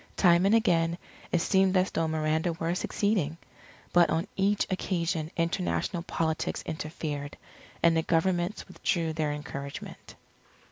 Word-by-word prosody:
Time 175 0 +5
and 210 - +5
again, 170 -7 +2 0.3
it 175 - +2
seemed 190 +2 +3
as 185 +1 +2
though 165 0 0
Miranda 160 +2 0
were 165 +1 -2
succeeding. 180 -4 0 0.6
But 175 -2 +6
on 160 +3 0
each 200 +1 +2
occasion 170 -4 -1
international 170 +1 0
politics 160 -2 -2
interfered, 150 -2 -4 0.5
and 170 -1 +5
the 165 - +3
Governments 175 +4 0
withdrew 170 -3 -1
their 155 -2 -1
encouragement. 140 -1 -7
170 Hz, 130 wpm, -28 LUFS, 160-185 Hz, 0.6 s, But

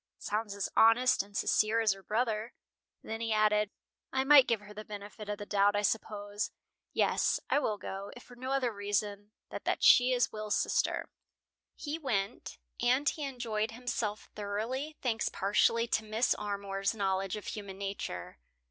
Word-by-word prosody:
"Sounds 210 -1 -3
as 200 - -2
honest 235 +3 +5
and 200 +1 -8
sincere 215 +2 +2
as 220 -2 +3
her 195 0 -5
brother." 220 +2 -1 0.5
Then 225 +1 -5
he 225 -1 -1
added: 210 -1 +3 0.4
"I 265 0 +1
might 275 -1 +8
give 230 -3 +1
her 210 0 -12
the 215 +1 -7
benefit 210 0 -8
of 210 - -2
the 205 - -7
doubt, 205 0 +3
I 205 - +1
suppose. 205 0 -1 0.4
Yes, - - +2
I - - +4
will 215 -7 -1
go, 195 +1 -6
if 245 - -11
for 245 - -15
no 255 +2 -5
other 260 -4 +1
reason 205 0 -2 0.2
than - - -4
that - - 0
she 250 +1 +7
is 245 -1 +2
Will's 215 -1 -2
sister." - - 0 0.6
He 300 +2 -4
went. 225 -7 -2 0.2
And 255 +4 +3
he 300 - 0
enjoyed 230 -5 -2
himself 225 -3 -4
thoroughly 230 +9 -3
thanks 230 -4 0
partially 220 +4 +2
to 220 - +1
Mrs. 220 +3 +1
Armour's 200 0 -2
knowledge 195 -2 0
of 210 - -7
human 200 -3 -6
nature. 195 - -5
215 Hz, 170 wpm, -31 LUFS, 205-240 Hz, 0.6 s, might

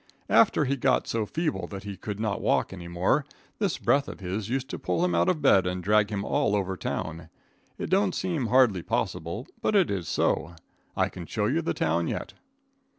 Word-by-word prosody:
After 175 -8 +5
he 140 +1 0
got 130 0 +2
so 110 -2 -1
feeble 160 +3 -2
that 100 -1 -7
he 100 -1 -6
could 105 +1 -6
not 110 -2 -1
walk - - +1
any 90 -2 -8
more, 90 +12 +1 0.4
this 200 -6 0
breath 140 0 +2
of - - -8
his 100 +3 -4
used 130 +1 -1
to - - -4
pull 175 - 0
him 180 - 0
out - - +3
of 160 -5 0
bed 95 -9 +5
and 90 0 -3
drag 105 +1 +3
him 100 -1 -3
all 140 -8 +1
over 95 -2 -1
town. 80 -2 -4 0.5
It - - -5
don't 190 -1 +3
seem 170 -9 -1
hardly 120 -7 +4
possible, 85 +7 -2 0.2
but 215 - +1
it 190 - +4
is 90 -5 -3
so. 85 +4 0 0.4
I - - +3
can 85 -2 -9
show 105 -2 -1
you 145 +10 +1
the 165 - -2
town 85 +1 +1
yet. - - -4
105 Hz, 210 wpm, -27 LUFS, 90-145 Hz, 0.5 s, After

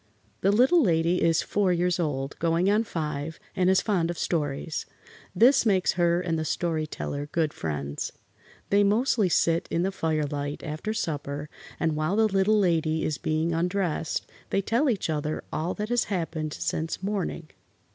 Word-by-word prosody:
The 195 - +4
Little 260 +11 +5
Lady 170 - +2
is 165 0 +3
four 200 -3 +1
years 180 0 +1
old, 140 -4 -2
going 170 +4 +2
on 215 +2 +3
five, 155 -3 -4 0.2
and 185 0 +3
is 190 -1 +4
fond 180 -6 +1
of 175 - -3
stories. 150 -1 -2 0.5
This 255 +4 +6
makes 195 -5 +3
her 175 -1 +2
and 165 -3 -1
the - - -1
Story 160 0 -1
Teller 145 -1 -4
good 160 -3 0
friends. 70 -2 -4 0.6
They 200 +1 +5
mostly 215 -1 +2
sit 165 0 +2
in 170 - 0
the 190 - 0
firelight 150 -4 -2
after 155 +7 -4
supper, 145 -6 -3 0.3
and 160 -1 +1
while 155 +5 0
the 220 +1 +4
Little 200 +1 +3
Lady 160 -5 +1
is 150 - -2
being 160 +2 0
undressed 175 -1 -1 0.2
they 195 - 0
tell 240 +8 +2
each 215 -6 0
other 155 -1 -2
all 165 +4 -1
that 210 +1 -4
has 240 0 +2
happened 160 -5 -3
since 160 +3 -3
morning. 190 -5 -3
170 Hz, 165 wpm, -26 LUFS, 155-195 Hz, 0.6 s, This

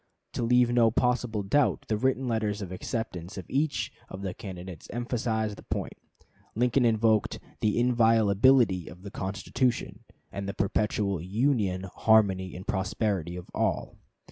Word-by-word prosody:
To - - -3
leave 120 +1 +4
no 120 -2 +5
possible 120 -2 0
doubt, 135 +8 +1
the 110 - +1
written 130 +3 0
letters 105 -3 -1
of 90 - -7
acceptance 95 -3 -5
of 95 - -6
each 145 +2 -1 0.2
of 95 +1 -8
the 95 -2 -3
candidates 90 -3 -9
emphasized 110 -3 -2
the - - -12
point. - - -3 0.6
Lincoln 125 +2 +2
invoked 110 -1 +2 0.2
"the 105 0 +1
inviolability 115 -3 +4
of 90 +1 -12
the 100 - -8
Constitution, 100 +7 -2 0.3
and 100 0 -4
the - - -5
perpetual 100 -2 0
union, 100 - 0
harmony, 95 -4 +3
and 90 +2 -8
prosperity 95 -3 -1
of 90 -1 -9
all." - - -1
110 Hz, 145 wpm, -28 LUFS, 95-120 Hz, 0.6 s, no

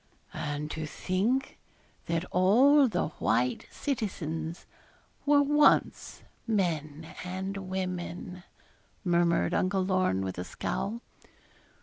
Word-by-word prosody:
'And 150 +1 -4
to 155 -1 -4
think 220 - -1 0.5
that 170 +1 -1
all 255 +11 +5
the 180 -8 -1
white 120 +3 +1
citizens 170 - -4 0.6
were 285 0 +6
once 295 +1 +2 0.2
men 160 -7 -1 0.2
and 190 +2 -4
women!' 180 -1 -4 0.6
murmured 170 -2 +2
Uncle 185 0 +1
Lorne, 185 - +1
with 95 -2 -4
a - - -2
scowl. 215 - -3
180 Hz, 95 wpm, -29 LUFS, 160-210 Hz, 0.6 s, were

